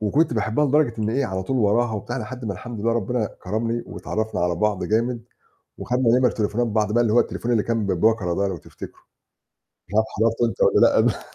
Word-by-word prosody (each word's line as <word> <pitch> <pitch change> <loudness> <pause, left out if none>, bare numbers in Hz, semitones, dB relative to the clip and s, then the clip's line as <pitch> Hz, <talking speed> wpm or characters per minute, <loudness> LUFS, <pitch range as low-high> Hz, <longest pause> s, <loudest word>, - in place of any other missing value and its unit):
وكنت 130 +10 +1
باحبها 110 +6 +1
لدرجة 145 -3 +2
إن 110 0 -1
إيه، 135 +4 0
على 95 -3 -3
طول 130 +8 -2
وراها 115 +1 +2
وبتاع 110 +5 -4
لحد 125 +2 -7
ما 105 - -2
الحمد 115 +3 -8
لله 115 +2 +1
ربّنا 115 0 -1 0.2
كرمني 115 +4 -2
واتعرّفنا 110 -2 -4
على 90 0 +1
بعض 105 +2 0
جامد، 115 +2 -1 0.5
وخدنا 125 -1 +2
نمَر 125 -2 +3
تليفونات 110 +2 -1
بعض 110 0 0
اللي 115 -3 +2
هو 120 - +5
التليفون 120 +1 -2
اللي 110 -3 +2
كان 115 -3 -1
ببَكَرة 95 -1 +1
ده 100 +2 0
لو 95 - -4
تفتكره، - - -11 0.9
مش 100 - -10
عارف 110 0 +3
حضرته 115 +2 +2
أنت - - -7
والّا - - +5
لأ. - - +1
110 Hz, 200 wpm, -23 LUFS, 105-120 Hz, 0.9 s, هو